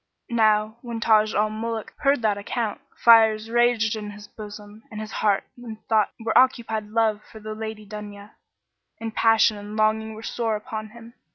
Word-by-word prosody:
Now 215 -1 +2
when 235 -2 -5
Taj 215 -1 +3
al 215 +1 +2
Muluk 225 0 -4
heard 275 -4 +2
that 210 -2 +2
account, 210 +2 -3 0.2
fires 225 -1 +6
raged 240 -2 +2
in 210 -1 -6
his 205 0 -11
bosom 210 0 -11
and 215 - -7
his 215 0 -6
heart 205 -2 +1
and 235 -3 -9
thought 215 -2 +3
were 225 -1 -2
occupied 230 -4 +2
love 215 -1 +1
for 220 - -11
the 215 0 -6
Lady 220 -1 -6
Dunya; 205 0 -9 0.7
and 225 -1 -5
passion 225 -1 +4
and 205 +1 -8
longing 220 0 +1
were 220 - -10
sore 225 -2 -1
upon 215 0 -6
him. 235 +1 -14
220 Hz, 175 wpm, -24 LUFS, 210-225 Hz, 0.7 s, fires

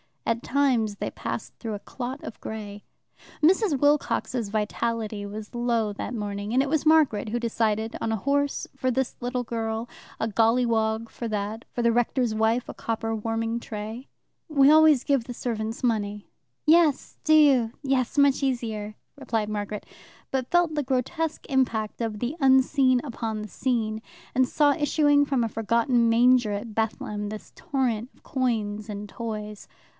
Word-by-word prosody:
At 230 0 0
times 250 -7 +1
they - - -4
passed - - -5
through 225 -2 -4
a 205 - -4
clot 255 +5 -6
of - - -8
grey. 205 -2 -7 0.6
Mrs. 365 -1 +4
Wilcox's 270 -4 +1
vitality 215 0 -2
was 210 +1 -8
low 235 -3 0
that 230 - -5
morning, 205 0 -4
and 260 +2 +4
it 280 - -3
was 315 +1 0
Margaret 295 -10 +4
who 240 +3 -1
decided 225 -1 -1
on 225 - -1
a - - +1
horse 280 +6 0
for 260 -1 -1
this 260 0 -1
little 245 0 -2
girl, 225 0 -3 0.3
a 225 - 0
golliwog 225 0 +2
for 235 - -5
that, 215 +1 -3
for 240 - -2
the 235 - +4
rector's 240 0 +1
wife 220 +3 +1
a - - -5
copper 225 0 -3
warming 225 +1 -2
tray. 220 +3 -7 0.4
"We 285 -3 +5
always 310 -4 +6
give 275 -5 +1
the 245 - -6
servants 225 -1 -3
money." 210 -3 -1 0.4
"Yes, 315 -3 +3
do 310 - +5
you, 270 -7 +5
yes, 265 -1 0
much 280 -1 +4
easier," 225 -5 -2 0.2
replied 225 -6 -2
Margaret, 210 0 -4 0.5
but 260 -2 -1
felt 350 -2 +3
the 300 - 0
grotesque 290 +5 -2
impact 235 -6 0
of 220 -2 -2
the 250 +6 -2
unseen 265 -1 +4
upon 225 -5 -4
the 215 - -7
seen, 220 -3 -1 0.3
and 260 0 +3
saw 290 +2 +3
issuing 290 -1 +3
from 270 -4 +1
a 225 - -1
forgotten 230 +2 +2
manger 240 -1 +4
at 215 +2 -5
Bethlehem 210 -1 -2
this 215 0 -8
torrent 250 -4 -1
of - - -28
coins 215 -5 -1
and 205 0 -5
toys. 215 -2 -6
235 Hz, 160 wpm, -26 LUFS, 215-265 Hz, 0.6 s, always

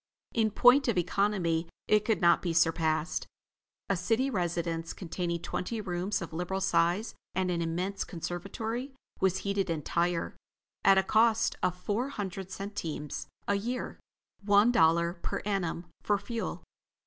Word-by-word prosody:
In 220 -2 +2
point 250 +6 +5
of 230 -5 +1
economy 175 -3 +1 0.2
it 210 0 +3
could 220 -1 +1
not 170 -1 +5
be 170 -2 -1
surpassed. 165 -1 +1 0.6
A 195 - +2
city 225 +9 +1
residence, 170 -4 -2
containing 170 -1 -3
twenty 225 +5 -3
rooms 185 -1 -2
of 165 - -8
liberal 180 +3 -2
size 190 +2 +1 0.2
and 185 -1 +1
an 170 -1 -1
immense 180 +4 -2
conservatory, 220 - -4 0.2
was 190 -1 +2
heated 200 -1 0
entire, 170 +2 -1 0.5
at 195 0 +6
a 190 - +5
cost 225 +2 +3
of 180 0 0
four 215 +8 -1
hundred 195 -6 -5
centimes 185 -7 -5 0.2
a 200 - +3
year. 235 +5 -3 0.4
One 205 +3 +5
dollar 170 -4 +4
per 170 - -4
annum 180 -4 -1 0.2
for 205 - +2
fuel. 225 +3 -4
190 Hz, 140 wpm, -30 LUFS, 170-210 Hz, 0.6 s, at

